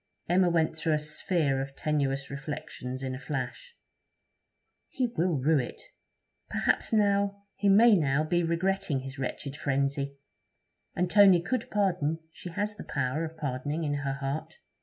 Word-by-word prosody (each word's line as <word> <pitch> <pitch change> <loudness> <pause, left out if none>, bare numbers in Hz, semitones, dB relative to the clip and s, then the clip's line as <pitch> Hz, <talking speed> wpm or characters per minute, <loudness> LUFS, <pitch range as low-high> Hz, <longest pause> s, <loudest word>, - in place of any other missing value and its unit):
Emma 180 +1 +4
went 160 -2 +1
through 160 0 0
a - - +2
sphere 150 -2 0
of 135 0 -6
tenuious 140 -3 -1
reflections 135 -2 -5
in 130 -1 -2
a 130 - -5
flash. 150 - -5 1.1
'He 260 - 0
will 170 -2 +1
rue 145 +3 +3
it. 125 - -5 0.7
Perhaps - - +1
now... 200 -2 +2
he 200 - +1
may 220 +3 +7
now 150 -3 +2
be 175 +3 +1
regretting 170 -3 0
his 135 +1 -8
wretched 135 +1 -4
frenzy. 140 0 -1 0.8
And 180 - +1
Tony 195 -1 +7
could 230 +7 -2
pardon; 180 -7 +1
she 180 - -9
has 205 +4 -2
the - - -7
power 140 +3 -1
of 160 0 -6
pardoning 145 +2 -2
in 145 -2 0
her 140 -1 -2
heart.' 140 +4 -4
155 Hz, 155 wpm, -29 LUFS, 140-185 Hz, 1.1 s, may